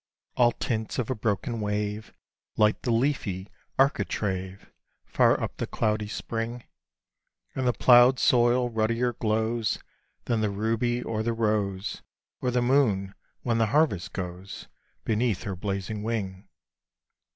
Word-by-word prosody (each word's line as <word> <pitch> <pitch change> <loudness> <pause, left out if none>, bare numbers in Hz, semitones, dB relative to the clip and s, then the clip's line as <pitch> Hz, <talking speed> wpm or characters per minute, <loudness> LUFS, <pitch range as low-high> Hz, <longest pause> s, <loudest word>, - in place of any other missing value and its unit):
All 120 -1 +5
tints 110 -2 -3
of 125 -1 -1
a - - 0
broken 110 +1 -2
wave 105 +1 -2 0.5
Light 105 0 +3
the - - -3
leafy 115 -6 0 0.3
architrave, 100 -7 -1 0.3
Far - - +3
up - - -4
the - - -3
cloudy 105 -1 0
spring; 115 +3 -4 0.9
And 130 -1 -1
the 125 - +3
ploughed 125 +3 +6
soil 120 0 +3
ruddier 115 +2 +1
glows 110 0 0 0.5
Than 115 -2 0
the 105 - +1
ruby 115 +4 0
or 110 -1 -2
the 115 +1 0
rose, 105 -4 -1 0.4
Or 125 - 0
the 125 0 +1
moon, 110 -7 +2 0.3
when 115 -2 +1
the 115 - +3
harvest 140 - +1
goes 90 +1 -6 0.4
Beneath 110 -2 0
her 95 - -4
blazing 100 +2 -3
wing. 100 -4 -3
110 Hz, 130 wpm, -27 LUFS, 105-120 Hz, 0.9 s, ploughed